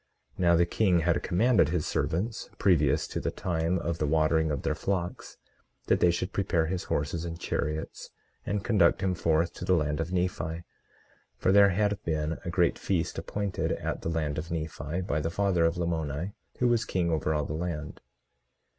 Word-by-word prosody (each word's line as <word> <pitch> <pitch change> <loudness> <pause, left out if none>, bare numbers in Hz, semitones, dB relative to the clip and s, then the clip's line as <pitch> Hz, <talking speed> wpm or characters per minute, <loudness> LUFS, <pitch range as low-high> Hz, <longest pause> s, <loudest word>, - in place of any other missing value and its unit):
Now 85 -1 +3
the 85 +1 +4
king 90 -1 +2
had 85 +1 +1
commanded 95 -3 +3
his 85 -2 -1
servants, 85 +10 -2
previous 80 -8 +3
to - - -3
the - - -1
time 85 0 -1
of 85 -1 -3
the 75 - +1
watering 80 +1 +2
of 70 -3 -2
their - - +1
flocks, 90 +2 -3 0.5
that - - +2
they 90 - +5
should 90 +2 -1
prepare 85 -4 +1
his 90 +2 -3
horses 75 +3 -1
and 85 -1 -5
chariots, 75 -1 -3 0.3
and 100 -1 -2
conduct 100 -8 +3
him 95 -1 +1
forth 85 -1 +1
to - - -8
the 95 - +3
land 75 -2 0
of 80 +2 -2
Nephi; 85 -2 -2 0.7
for - - +2
there 100 0 +7
had 105 +1 0
been 80 0 -1
a 85 - -4
great 85 -1 +2
feast 90 -4 -1
appointed 100 -2 -2
at - - -3
the - - -3
land 75 -3 -1
of 80 +2 -6
Nephi, 80 0 -3
by 75 -4 -1
the 80 +2 -1
father 95 -2 +2
of 85 +1 +1
Lamoni, 85 +1 -2 0.2
who 125 - +2
was 120 -1 +2
king 90 -5 0
over 80 -1 0
all 75 -1 0
the 75 - -4
land. 80 -2 -4
85 Hz, 190 wpm, -28 LUFS, 80-90 Hz, 0.7 s, there